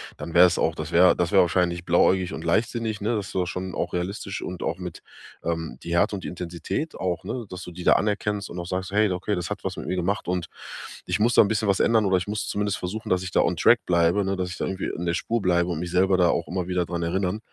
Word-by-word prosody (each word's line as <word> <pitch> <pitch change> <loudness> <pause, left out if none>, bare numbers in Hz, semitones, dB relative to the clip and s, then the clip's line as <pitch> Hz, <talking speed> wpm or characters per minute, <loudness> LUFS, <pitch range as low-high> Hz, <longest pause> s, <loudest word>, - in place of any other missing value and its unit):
dann 85 - -8
wäre 90 +1 +9
es 90 - +1
auch 80 - +1
das 80 +1 -5
wäre 90 +2 +6
das 85 -1 0
wäre 95 - +6
wahrscheinlich 85 -1 +1
blauäugig 90 +2 +3
und 80 - -6
leichtsinnig, 110 +4 0
ne? 115 +3 0
Das 105 -2 -2
ist - - -11
doch 90 -2 +1
schon 90 0 -4
auch 85 - -3
realistisch 95 +3 -3
und 90 -1 -6
auch 85 - -2
mit, 90 -2 -7 0.4
ähm, 80 -6 -3
die 85 - -4
Härte 100 +5 +3
und 95 - -7
die - - -4
Intensität 90 - -4
auch, 95 0 -2
ne, 115 +3 -5
dass 90 0 -7
du - - -8
die 90 +1 -8
da - - +6
anerkennst 105 -1 -1
und 90 - -6
auch 85 - -5
sagst: 95 +1 -3
„Hey, 105 +1 +3
okay, 90 +3 -2
das 90 -3 -2
hat 105 0 -5
was 95 -1 -3
mit - - -7
mir - - -1
gemacht 95 +4 -1
und 90 -1 -2 0.6
ich - - +1
muss 115 +3 +3
da - - +7
'n 105 - +3
bisschen 110 0 0
was 100 -1 +2
ändern 110 -2 +3
oder 95 -1 +3
ich 90 - -3
muss 105 +1 -3
zumindest 105 -1 -1
versuchen, 105 +5 -5
dass 90 0 +1
ich 95 - -5
da - - +2
on - - +1
Track - - +5
bleibe, 85 +3 +3
ne, 95 0 -1
dass 90 -1 -2
ich 85 - -7
da - - -2
irgendwie 95 0 -3
in 85 - -4
der 85 - +1
Spur 90 - -6
bleibe 85 -1 +2
und 85 -3 -2
mich 90 0 -4
selber 95 +1 +3
da 90 -1 +4
auch 85 - 0
immer 90 -1 -2
wieder 90 -1 0
dran 85 0 -3
erinneren 95 +4 -1
90 Hz, 285 wpm, -25 LUFS, 85-100 Hz, 0.6 s, wäre